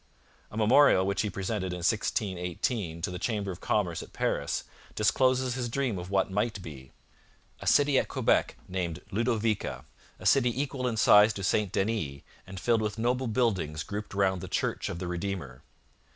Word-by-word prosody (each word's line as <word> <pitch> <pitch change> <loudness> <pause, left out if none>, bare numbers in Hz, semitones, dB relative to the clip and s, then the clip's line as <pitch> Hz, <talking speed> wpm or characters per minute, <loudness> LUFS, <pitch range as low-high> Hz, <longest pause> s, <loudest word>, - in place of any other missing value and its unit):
A 105 - -9
memorial 110 -3 +5
which 100 0 0
he 105 - -1
presented 95 -2 -3
in - - -4
1618 90 -3 -1
to 95 - -1
the 90 - -5
Chamber 105 -3 -2
of 90 - -9
Commerce 90 -6 0
at - - -12
Paris - - -1 0.3
discloses 130 +3 +2
his 125 -2 -3
dream 120 -6 -1
of 90 +1 -7
what 95 -1 +1
might 105 +2 -1
be: 70 -6 -10 0.7
a - - -7
city 145 -2 +5
at - - -2
Quebec - - +1
named 90 -4 -3
Ludovica, 110 -1 -1 0.3
a - - -12
city 125 -2 +3
equal 135 -2 -2
in 115 -2 -2
size 105 0 +6
to 100 - -6
St 100 0 +1
Denis 95 -10 -1 0.3
and 95 0 -7
filled 115 +2 +2
with 105 0 -2
noble 125 +3 0
buildings 95 -10 0
grouped 105 0 -6
round 95 -2 +1
the - - -6
Church - - -1
of - - -4
the 90 - -5
Redeemer. 85 -7 -4
105 Hz, 175 wpm, -29 LUFS, 90-115 Hz, 0.7 s, size